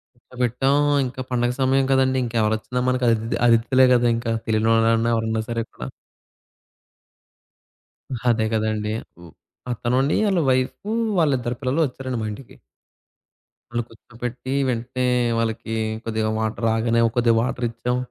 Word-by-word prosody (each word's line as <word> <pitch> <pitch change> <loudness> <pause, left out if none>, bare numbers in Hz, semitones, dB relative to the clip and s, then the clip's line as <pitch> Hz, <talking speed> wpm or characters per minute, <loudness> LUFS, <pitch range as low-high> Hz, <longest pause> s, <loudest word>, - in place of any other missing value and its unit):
కూర్చోబెట్టాం 125 +2 -1 0.3
ఇంకా 130 +1 -6
పండుగ 120 -1 +1
సమయం 135 0 +3
కదండీ! 130 0 +3
ఇంకెవరొచ్చినా 115 +1 -1
మనకి 125 0 +1
అదితి 115 0 0
అతిథులే 120 +3 +4
గదా! 120 -1 +3
ఇంకా. 115 0 -2
తెలియనోళ్ళన్నా 115 +1 +2
ఎవరన్నా 110 0 -1
సరే 115 -1 -1
కూడా. - - -8 2.4
అదే 110 -2 +2
గదండీ! 110 -1 -1 0.3
ఓ - - -14 0.4
పక్కనుండి 125 +3 0
ఆళ్ళ 190 -3 +2
వైఫూ, 130 +11 -1 0.3
వాళ్ళిద్దరు 130 -6 +1
పిల్లలూ 135 +4 0
ఒచ్చారండి 130 -1 -5
మా 110 - -2
ఇంటికి. 120 +4 -12 1.2
వాళ్ళు 120 0 0
కూర్చోబెట్టి 120 +3 -7 0.2
వెంటనే 125 +1 -2 0.3
వాళ్ళకి 115 0 -2 0.3
కొద్దిగా 110 -1 -1
వాటర్ 110 +1 -2
రాగానే 115 +1 +1 0.2
కొద్దిగా 115 -1 +4
వాటర్ 125 0 -2
ఇచ్చాం. 120 +2 -2
120 Hz, 120 wpm, -22 LUFS, 115-130 Hz, 2.4 s, అతిథులే